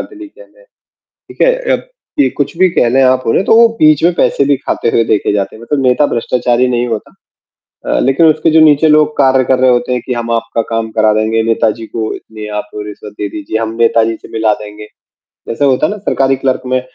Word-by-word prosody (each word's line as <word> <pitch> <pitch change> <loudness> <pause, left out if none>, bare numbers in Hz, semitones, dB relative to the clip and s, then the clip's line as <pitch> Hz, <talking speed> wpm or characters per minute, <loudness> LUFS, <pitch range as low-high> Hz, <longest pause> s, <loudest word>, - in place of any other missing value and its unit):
ठीक 450 +8 -16 0.6
है? - - +4 0.2
अ, - - +3 0.6
कुछ 145 +3 -3
भी 185 - +4
कह 120 - +1
लें 135 +2 +2
आप 130 0 +2
उन्हें, 150 +11 +1
तो - - +3
वो 230 0 +6
बीच 155 -1 +4
में 175 - +4
पैसे 140 - +1
भी 140 - +3
खाते 120 - -3
हुए 115 - +1
देखे 110 -2 0
जाते 100 +1 -3
हैं, 115 - -15
मतलब 140 +4 -2
नेता 130 +4 +3
भ्रष्टाचारी 120 +1 0
नहीं 120 -1 -1
होता। 110 -2 -5 0.8
अ, - - +1
लेकिन 135 +5 +2
उसके 160 +1 +2
जो 160 - +4
नीचे 155 0 +4
लोग 150 0 +3
कार्य 130 -1 +3
कर 130 0 +1
रहे 130 0 +3
होते 125 0 0
हैं, 125 - -2
कि 125 - -2
हम 115 -1 -4
आपका 115 0 -1
काम 115 -1 -2
करा 110 -1 +2
देंगे, 110 +1 0
नेताजी 115 0 -1
को 110 -1 -4
इतनी 110 -1 -10
आप 105 - -6
रिश्वत 105 0 -8
दे 105 - -3
दीजिए, 150 -6 -5
हम 115 0 -3
नेताजी 115 -1 +2
से - - -12
मिला 110 -1 +1
देंगे। 105 0 -11 0.6
जैसे 115 +5 -2
होता 130 -2 +2
है - - -3
ना 210 - -6
सरकारी 135 -8 0
क्लर्क 130 -1 -1
में 130 0 0
125 Hz, 215 wpm, -13 LUFS, 115-145 Hz, 0.8 s, वो